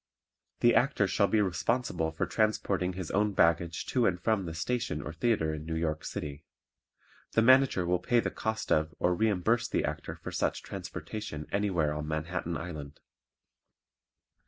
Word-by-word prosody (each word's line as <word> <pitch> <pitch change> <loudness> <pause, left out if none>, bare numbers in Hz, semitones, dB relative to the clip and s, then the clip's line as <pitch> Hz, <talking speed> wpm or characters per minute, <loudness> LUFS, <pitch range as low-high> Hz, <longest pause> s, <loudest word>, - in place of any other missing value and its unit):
The 120 - +6
Actor 135 -5 +3
shall 100 +1 +3
be 105 +2 +3
responsible 95 -2 0
for 80 - -1
transporting 100 -4 0
his 90 -2 -5
own 105 +1 +2
baggage 85 -1 +2
to 125 -3 +4
and 90 -2 0
from 100 0 +1
the 85 -1 -5
station 95 -3 -1
or 75 +2 -6
theatre 80 -4 +1
in 75 0 -5
New 80 +1 -4
York 80 -1 -1
City. 75 +1 -5 0.9
The 115 - +4
Manager 130 -6 +5
will 90 +1 +1
pay 120 +6 +2
the - - -1
cost 110 0 -3
of 80 +1 +2
or 90 - +2
reimburse 110 +4 +1
the - - 0
Actor - - -4
for - - -8
such - - -1
transportation 105 -9 -6
anywhere 90 -7 +1
on 75 0 -4
Manhattan 85 +2 -2
Island. 75 -4 -7
90 Hz, 160 wpm, -30 LUFS, 80-110 Hz, 0.9 s, The